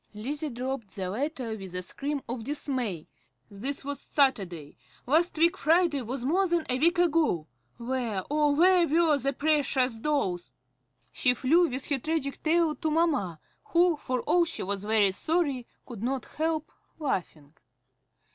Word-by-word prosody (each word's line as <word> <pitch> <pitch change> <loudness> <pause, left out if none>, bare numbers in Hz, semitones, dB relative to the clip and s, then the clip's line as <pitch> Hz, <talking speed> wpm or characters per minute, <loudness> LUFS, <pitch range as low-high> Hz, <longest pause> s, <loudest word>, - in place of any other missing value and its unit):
Lizzie 285 +8 -3
dropped 250 -3 -5
the 185 -2 -3
letter 255 -1 -3
with 190 -3 -9
a 180 - -2
scream 280 +8 -3
of 235 -1 -4
dismay. 255 - -3 0.4
This 265 +8 -3
was 285 0 -4
Saturday. 190 - 0 0.3
Last 320 +6 +2
week 335 +2 +4
Friday 325 -2 +2
was 245 +2 -4
more 370 +7 +2
than 345 -2 0
a 255 +1 0
week 340 +5 +3
ago. 320 - +2 0.3
Where, 235 -5 -2
oh, 295 -1 +2
where 355 +2 +5
were 320 0 +3
the 275 +1 +1
precious 275 -4 +1
dolls? 195 - -1 0.6
She 250 - +2
flew 330 +8 +3
with 260 +1 -1
her 285 -2 0
tragic 305 -1 -2
tale 325 0 +2
to 320 - -1
mamma, 295 - 0 0.3
who, 345 0 +3
for 255 -4 -3
all 350 +7 +3
she 330 -1 -3
was 200 +1 -2
very 210 -2 +4
sorry, 285 - 0 0.2
could 235 -6 -9
not 255 +1 -2
help 315 0 -2 0.3
laughing. 170 - -4
275 Hz, 155 wpm, -28 LUFS, 225-315 Hz, 0.6 s, where